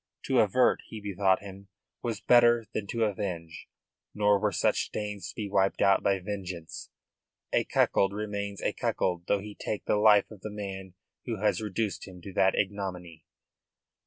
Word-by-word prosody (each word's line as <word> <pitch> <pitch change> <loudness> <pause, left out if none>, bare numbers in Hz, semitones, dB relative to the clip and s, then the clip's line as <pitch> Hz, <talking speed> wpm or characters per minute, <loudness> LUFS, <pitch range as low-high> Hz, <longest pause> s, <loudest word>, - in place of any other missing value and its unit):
To - - +2
avert, - - +3
he 110 - -8
bethought 100 -1 +1
him, 100 0 -10 0.3
was 115 -2 -3
better 120 -1 +5
than 105 -2 -3
to 115 +2 -1
avenge. 90 -6 -4 0.5
Nor 105 -1 +3
were 105 0 +1
such - - +1
stains 105 -2 -5
to - - -10
be 105 -3 -3
wiped 95 -1 +1
out 100 -1 +4
by 100 -1 +2
vengeance. 95 -4 -6 0.6
A - - +2
cuckold 95 -1 +2
remains 100 -1 -4
a - - 0
cuckold 90 -1 -1
though 100 - +2
he 105 0 -8
take 105 0 -5
the - - +2
life 105 -1 +5
of 105 -3 -12
the 110 - -5
man 95 -3 -7 0.3
who 115 - -1
has 105 +2 +1
reduced 105 0 -3
him 90 -2 -11
to 95 - -8
that 95 0 +3
ignominy. 95 -4 -3
100 Hz, 170 wpm, -29 LUFS, 95-105 Hz, 0.6 s, better